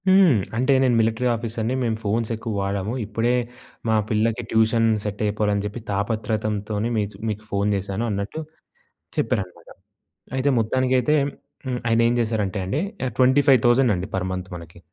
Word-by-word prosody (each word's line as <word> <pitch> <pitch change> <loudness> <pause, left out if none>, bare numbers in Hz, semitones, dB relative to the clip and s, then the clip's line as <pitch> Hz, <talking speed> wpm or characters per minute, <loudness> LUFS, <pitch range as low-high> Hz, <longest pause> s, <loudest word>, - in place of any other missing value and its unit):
హ్మ్. 190 - +6 0.2
అంటే, 130 +3 +3
"నేను 125 -2 +3
మిలిటరీ 115 +2 +1
ఆఫీసర్‌ని. 115 +1 -2
మేము 115 -2 0
ఫోన్స్ 110 +2 0
ఎక్కువ 110 0 -5
వాడము. 100 +2 -2
ఇప్పుడే 115 +4 0 0.5
మా 110 - +3
పిల్లకి 110 +2 +1
ట్యూషన్ 110 +1 +3 0.2
సెట్ 105 -1 -4
అయిపోవాలని 105 -1 0
చెప్పి 105 +3 -5
తాపత్రతంతోనే 105 +1 -1
మీకు 105 -2 -2
మీకు 105 0 -4
ఫోన్ 100 0 0
చేశాను" 100 +3 -3
అన్నట్టు 100 +8 -3 0.8
చెప్పారనమాట. 90 -4 -2 0.7
అయితే 130 +2 +1
మొత్తానికైతే 130 +4 +2 0.5
హ్మ్, 130 -2 -2
ఆయనేం 115 +1 +3
చేశారంటే 110 -4 -1
అండి, 100 +11 -1 0.2
ఆహ్, 130 - -1
25,000 130 -1 +4
అండి 90 +1 -3
పర్ 95 -1 0
మంత్ 90 0 -4
మనకి. 85 -1 -10
110 Hz, 140 wpm, -23 LUFS, 100-120 Hz, 0.8 s, హ్మ్